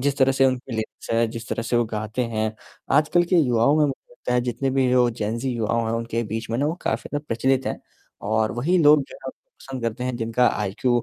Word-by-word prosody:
जिस 140 +1 0
तरह 135 0 +4
से 135 0 +3
उनकी 130 -1 -2
लेंस 110 - -6
है, 115 0 +3
जिस 115 0 -7
तरह 115 - -2
से 120 +1 0
वो 120 - +3
गाते 110 +3 -2
हैं 110 0 0 0.4
आजकल 155 +4 +4
के - - +6
युवाओं 130 -2 +3
में 140 - 0 0.5
जितने 125 +2 -1
भी 130 -1 +2
वो 125 -1 +4
जेन 115 0 -3
ज़ी 130 +2 -2
युवा 115 -2 -1
हैं 110 - -1
उनके 115 0 -2
बीच 110 +1 -4
में 115 - 0
ना 145 - +1
वो 155 - -1
काफ़ी - - -2
ज्यादा 145 0 -3
प्रचलित 130 +3 +1
हैं। - - -3 0.4
और 110 +1 +1
वही 150 +10 +1
लोग 150 -1 +6
जो 135 - -9
है - - -11
उनको 130 - -10
पसंद 130 -3 -7
करते 115 +2 -2
हैं 125 -1 -2
जिनका 115 +1 +1
आईक्यू 115 +4 0
120 Hz, 235 wpm, -23 LUFS, 115-135 Hz, 0.5 s, के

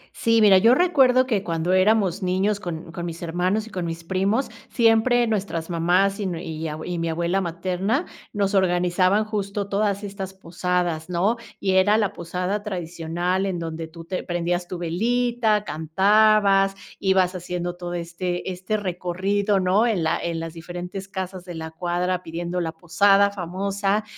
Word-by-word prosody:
Sí, 230 -1 +3
mira, 195 -3 +7
yo 230 +5 +6
recuerdo 265 -7 +4
que 215 -6 0
cuando 170 +1 -1
éramos 195 -1 +3
niños 190 +3 +1
con 170 -3 -6
con 170 +1 -6
mis 170 0 -6
hermanos 180 +6 0
y 225 - -13
con 180 -3 -3
mis 165 0 -5
primos, 195 +8 0 0.2
siempre 235 +1 +3
nuestras 190 -6 -2
mamás 180 +4 +2
y 200 - -1
nue 170 -2 -4
y 160 0 -4
ab 155 0 -5
y 175 -1 -3
mi 165 0 -1
abuela 170 +4 0
materna, 185 - -1 0.3
nos 200 -1 0
organizaban 185 +2 +2
justo 205 -1 -3
todas 200 0 0
estas 195 -1 -6
posadas, 175 -2 -2
¿no?, 195 +7 +1 0.2
y 190 - 0
era 195 +3 +4
la 210 -3 0
posada 180 +4 -3
tradicional 175 -1 -2
en 185 -2 -2
donde 165 -1 -5
tú 165 0 -12
te 185 +1 -3
prendías 175 0 -2
tu 180 - -5
velita, 225 +5 +1
cantabas, 195 +5 +3 0.2
ibas 190 -1 +2
haciendo 175 0 -4
todo 175 0 -5
este 175 +2 -3
este 185 +4 -2
recorrido, 195 +2 0
¿no?, 190 +6 +3
en 200 -7 0
la 160 +1 +1
en 170 -1 -2
las 165 0 -6
diferentes 180 +3 -7
casas 190 -2 -5
de 175 -2 -8
la 160 0 -6
cuadra 180 +2 -1
pidiendo 175 +2 -4
la 165 -1 -2
posada 195 +5 +3
famosa, 195 +2 -1
185 Hz, 165 wpm, -23 LUFS, 175-200 Hz, 0.3 s, mira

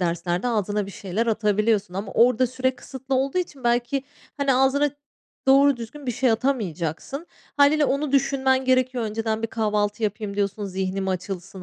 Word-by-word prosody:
derslerde 175 +4 -1
ağzına 210 -2 -1
bir - - -8
şeyler 200 +4 -3
atabiliyorsun 210 -3 +1
ama 195 +1 -4
orada 250 +1 +4
süre 255 +1 -1
kısıtlı 265 0 -5
olduğu 270 +6 +1
için 290 -8 -5
belki, 240 +3 +1 0.3
hani, 280 -2 +2
ağzına 270 +2 +3 0.6
doğru 275 0 +6
düzgün 250 +4 -9
bir 245 - 0
şey 250 +1 +2
atamayacaksın. 225 - -2 0.3
Hâliyle 290 +1 +5
onu 280 +1 -1
düşünmen 265 -1 +2
gerekiyor. 255 -2 +2
Önceden 220 +1 -2
bir - - +1
kahvaltı 210 -1 -1
yapayım 205 -1 -2
diyorsun, 205 +1 -1
zihnim 190 0 -2
açılsın, 185 0 -5
230 Hz, 155 wpm, -24 LUFS, 205-265 Hz, 0.6 s, doğru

